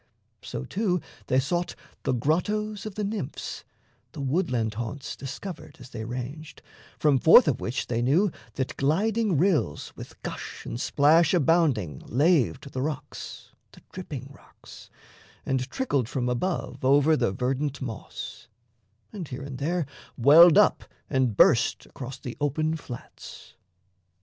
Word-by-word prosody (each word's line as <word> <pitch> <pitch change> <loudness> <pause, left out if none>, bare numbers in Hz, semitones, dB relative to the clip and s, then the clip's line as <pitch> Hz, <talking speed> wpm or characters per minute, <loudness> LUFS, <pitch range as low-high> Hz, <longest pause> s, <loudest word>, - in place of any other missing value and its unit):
So, 65 - -6
too, 190 -4 0 0.3
they 130 - +3
sought 175 +6 -1 0.3
the - - +2
grottos 205 - 0
of 205 - -8
the 215 - -2
Nymphs 200 -9 -4 0.5
The - - -8
woodland 130 - 0
haunts 120 +5 -5
discovered 160 +6 -8
as 125 0 -12
they 110 -2 -5
ranged 130 +6 -7 0.3
From 145 -3 +3
forth 190 - +8
of 135 - 0
which 120 +4 -2
they 120 -1 -1
knew 165 +11 +3 0.2
that 130 +1 -3
gliding 200 +6 +1
rills 160 - +1
With - - -11
gush - - -6
and 120 - -4
splash 160 +5 +4
abounding 140 - +2
laved 140 0 +2
the 130 - -3
rocks, 150 +1 -6 0.2
The - - -16
dripping 140 -7 -7
rocks, - - -15 0.6
and 130 -1 -1
trickled 140 - -1
from 125 -2 -1
above 165 +8 -2
Over 145 +4 +5
the 120 - +1
verdant 135 +7 -2
moss; 115 -2 -7 0.7
and 185 -7 -6
here 130 +1 -6
and 135 -2 -7
there 165 +3 0 0.3
Welled 150 +6 +8
up - - +4 0.3
and 130 -6 +1
burst 115 -1 +4
across 130 0 -8
the 125 -2 -7
open 155 +2 0
flats. 125 -6 -10
140 Hz, 140 wpm, -26 LUFS, 125-170 Hz, 0.7 s, forth